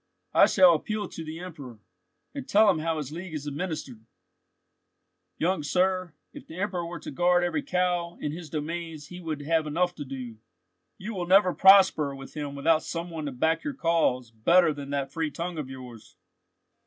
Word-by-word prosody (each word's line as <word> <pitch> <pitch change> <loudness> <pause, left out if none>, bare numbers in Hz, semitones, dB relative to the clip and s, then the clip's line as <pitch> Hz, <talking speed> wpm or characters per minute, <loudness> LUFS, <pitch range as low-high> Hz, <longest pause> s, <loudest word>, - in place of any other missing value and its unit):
"I - - +7
shall 185 -3 +6
appeal 210 +6 -2
to 165 - -7
the 160 +1 -7
Emperor, 150 -10 -9 0.6
and 275 -2 -7
tell 210 0 +6
him 165 - -2
how 160 0 -1
his 150 -2 -5
League 170 +1 -7
is 150 -1 -5
administered." 145 -6 -5 1.3
"Young 175 0 0
sir, 185 +2 0 0.2
if - - -11
the 160 - -10
Emperor 190 -3 -2
were 170 -1 -6
to - - -8
guard 175 +4 +3
every 175 - 0
cow 180 -8 -1
in 150 - -3
his 165 0 -8
domains 160 0 -5
he 180 - -9
would 155 -4 -5
have 160 +1 +1
enough 175 +4 0
to 150 - -7
do. 130 -4 -7 0.6
You 215 +4 -6
will 180 -3 -4
never 185 -1 +5
prosper 190 -7 +6
with 135 0 -11
him 145 -2 -5
without 155 +3 +3
some 170 +1 -5
one 155 -2 -5
to - - -3
back 160 +6 0
your 285 - -4
cause 165 - +1
better 165 +9 +4
than 140 -1 -8
that 140 -1 -2
free 160 +1 -2
tongue 170 +2 -5
of 140 -3 -5
yours. 125 -4 -11
165 Hz, 190 wpm, -27 LUFS, 145-180 Hz, 1.3 s, I